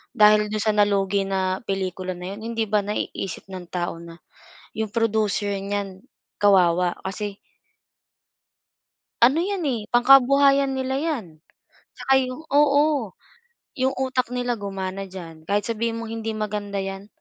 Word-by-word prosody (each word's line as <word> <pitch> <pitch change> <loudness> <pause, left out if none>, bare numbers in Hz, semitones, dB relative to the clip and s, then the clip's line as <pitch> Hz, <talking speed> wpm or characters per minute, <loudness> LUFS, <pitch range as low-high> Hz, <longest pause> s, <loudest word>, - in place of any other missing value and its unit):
dahil 210 0 +6
dun 210 0 -2
sa 215 - +3
nalugi 200 -1 +2
na 190 -1 -1
pelikula 185 -1 -3
na 180 +2 -6
yun 205 - -9
hindi 225 - 0
ba 210 0 +1
naiisip 200 -2 -4
ng 185 -2 -9
tao 175 -2 -3
na 170 0 -11 0.6
yung 220 -1 -3
producer 215 -2 0
niyan 195 -1 -4 0.4
kawawa, 180 -3 +4
kasi 195 +1 -4 1.9
Ano 275 +7 +4
'yan 380 -1 -2
eh, 235 -7 -2
pangkabuhayan 275 +2 +5
nila 265 0 -1
'yan, 300 - -2 0.7
saka 270 0 +2
yung 255 +3 -3
oo, 285 -5 +3 0.6
yung 260 +1 +1
utak 255 -1 -1
nila 245 -1 -1
gumana 195 -1 -4
diyan 165 -4 -10
kahit 205 +3 +1
sabihin 230 0 -1
mong 230 -1 -6
hindi 225 0 -3
maganda 210 -1 -3
yan 195 +1 -6
210 Hz, 135 wpm, -23 LUFS, 195-250 Hz, 1.9 s, dahil